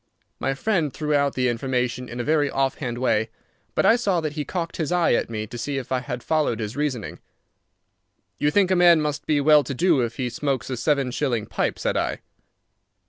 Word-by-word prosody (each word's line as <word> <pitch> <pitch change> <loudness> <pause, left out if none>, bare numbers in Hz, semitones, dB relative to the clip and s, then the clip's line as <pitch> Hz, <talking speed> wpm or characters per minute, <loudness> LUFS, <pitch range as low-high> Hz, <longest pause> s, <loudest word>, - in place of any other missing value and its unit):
My 135 0 -1
friend 165 -3 0
threw 150 +3 -2
out 140 -1 +2
the 125 -1 +1
information 125 0 -1
in 120 - -6
a - - -1
very 150 0 +2
offhand 135 -3 -1
way, 115 -3 +1 0.5
but - - +2
I 225 - +6
saw 200 -7 +1
that 155 -2 -3
he 150 -1 -3
cocked 170 +3 -4
his 160 -2 -2
eye 175 -1 +3
at - - 0
me 110 -2 -3
to 120 +3 -8
see 140 +4 -3
if 130 -2 -6
I 130 - +2
had 125 -1 -6
followed 155 -8 0
his 110 0 -4
reasoning. 140 -7 -3 1.2
"You 145 - +2
think 190 +3 +2
a - - +4
man 175 -2 +6
must 150 -1 -3
be 150 -2 +2
well 150 +1 +5
to 135 +1 -5
do 165 -1 +3
if 115 -1 -2
he 125 -2 -2
smokes 135 -1 -2
a 130 - -2
seven 140 0 +1
shilling 120 -5 -1
pipe," - - -2
said - - -1
I. - - -2
140 Hz, 215 wpm, -24 LUFS, 125-155 Hz, 1.2 s, I